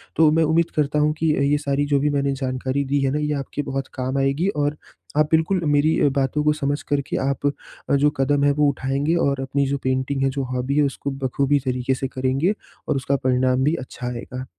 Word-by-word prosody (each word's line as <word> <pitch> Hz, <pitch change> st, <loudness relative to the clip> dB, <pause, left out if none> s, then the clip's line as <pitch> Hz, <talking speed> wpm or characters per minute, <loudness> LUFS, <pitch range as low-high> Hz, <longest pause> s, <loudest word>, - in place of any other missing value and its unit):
तो 160 Hz, -1 st, +5 dB
मैं 160 Hz, +1 st, +3 dB
उम्मीद 160 Hz, +2 st, +2 dB
करता 150 Hz, 0 st, +1 dB
हूँ 150 Hz, 0 st, +3 dB
अ, -, -, -3 dB
कि 160 Hz, -1 st, +2 dB, 0.2 s
ये 150 Hz, -, +4 dB
सारी 145 Hz, 0 st, 0 dB
जो 145 Hz, -1 st, +2 dB
भी 150 Hz, +1 st, +1 dB
मैंने 140 Hz, -1 st, 0 dB
जानकारी 130 Hz, +2 st, -1 dB
दी 140 Hz, +1 st, 0 dB
है 135 Hz, -1 st, +1 dB
ना, 150 Hz, -, 0 dB
ये 150 Hz, 0 st, -1 dB
आपके 145 Hz, -, -4 dB
बहुत 135 Hz, 0 st, -3 dB
काम 130 Hz, +1 st, -2 dB
आएगी 140 Hz, +7 st, +1 dB, 0.2 s
और 145 Hz, +1 st, 0 dB, 0.4 s
आप 150 Hz, 0 st, +4 dB
बिल्कुल 170 Hz, +3 st, +2 dB
मेरी 150 Hz, +1 st, +3 dB, 0.2 s
बातों 140 Hz, +2 st, 0 dB
को 150 Hz, -, +3 dB
समझ 145 Hz, -1 st, -2 dB
कर 145 Hz, -1 st, 0 dB
के -, -, -1 dB
आप 140 Hz, +1 st, -2 dB, 0.4 s
अ, 140 Hz, -, +4 dB
जो 145 Hz, +1 st, +4 dB
कदम 140 Hz, +1 st, +2 dB
है, 145 Hz, -, +4 dB
वो 145 Hz, +1 st, +2 dB
उठाएँगे 140 Hz, +4 st, -1 dB
और 140 Hz, -1 st, -1 dB
अपनी 135 Hz, +1 st, 0 dB
जो 140 Hz, +1 st, 0 dB
पेंटिंग 130 Hz, +1 st, 0 dB
है, 135 Hz, -, +3 dB
जो 135 Hz, 0 st, -3 dB
हॉबी 130 Hz, +2 st, -1 dB
है 150 Hz, -, +5 dB
उसको 140 Hz, 0 st, -2 dB
बख़ूबी 135 Hz, +1 st, 0 dB
तरीक़े 130 Hz, +1 st, 0 dB
से 135 Hz, -, -3 dB
करेंगे 135 Hz, +8 st, 0 dB, 0.3 s
और -, -, +1 dB
उसका 135 Hz, +1 st, 0 dB
परिणाम 130 Hz, 0 st, +2 dB
भी 150 Hz, +4 st, +2 dB
अच्छा 125 Hz, -1 st, -7 dB
आएगा। 125 Hz, +1 st, -6 dB
140 Hz, 230 wpm, -22 LUFS, 135-150 Hz, 0.4 s, तो